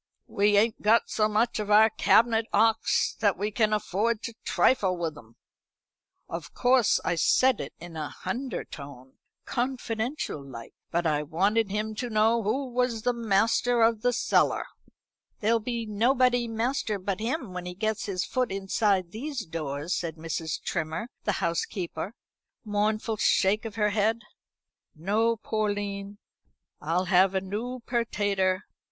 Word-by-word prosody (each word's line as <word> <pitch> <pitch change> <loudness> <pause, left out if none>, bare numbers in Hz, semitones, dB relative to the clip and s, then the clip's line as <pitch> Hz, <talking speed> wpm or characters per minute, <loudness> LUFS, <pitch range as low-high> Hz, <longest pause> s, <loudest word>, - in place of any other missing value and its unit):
We 205 0 +2
ain't 220 +2 +2
got 220 +3 +3
so 215 -1 +2
much 220 +2 +1
of 210 -1 -3
our 215 +1 +6
cabinet 225 +1 +3
'ocks 225 +2 +2
that 205 -4 +2
we 205 +3 -2
can 215 0 +2
afford 215 +2 0
to 230 - -5
trifle 190 -8 +2
with 165 -3 -3
'em.' 115 -3 -15 0.9
Of 165 -2 -7
course 250 -3 +3
I 180 - +1
said 255 +8 +3
it - - -7
in 175 -1 -10
a 155 -2 -4
hundertone, 145 - -6 0.3
confidential 240 - -3
like; 120 -4 -10 0.2
but 170 +1 -1
I 150 -2 +2
wanted 195 +8 +1
him 210 +2 -2
to 245 - -3
know 220 +1 +3
who 240 +7 -1
was 240 -2 -1
master 230 0 +2
of 225 -1 +3
the 245 - +2
cellar." 245 - +2 0.7
"There'll 225 +2 +2
be 235 0 -3
nobody 245 +3 +2
master 225 -1 -1
but 190 0 -3
him 235 - -3
when 180 0 -5
once - - -5
he 180 - -6
gets 215 +2 -2
his 190 -2 -1
foot 255 -5 -1
inside 195 -1 0
these 255 +2 -5
doors," 155 0 -4
said 165 -3 -3
Mrs. 160 0 -4
Trimmer, 165 +6 -3 0.2
the 210 - +1
housekeeper, 170 +3 -3
with - - -56
a - - -10
mournful 215 +1 0
shake 210 +3 +2
of 220 -2 -6
her 210 -2 +1
head. 220 +2 +1 0.7
"No, 215 +8 +1
Porline, 205 -2 -3 0.6
I'll 170 +5 0
have 190 +1 +4
a 190 - +1
noo 230 +6 -5
pertater. 205 -5 0
210 Hz, 150 wpm, -27 LUFS, 185-230 Hz, 0.9 s, our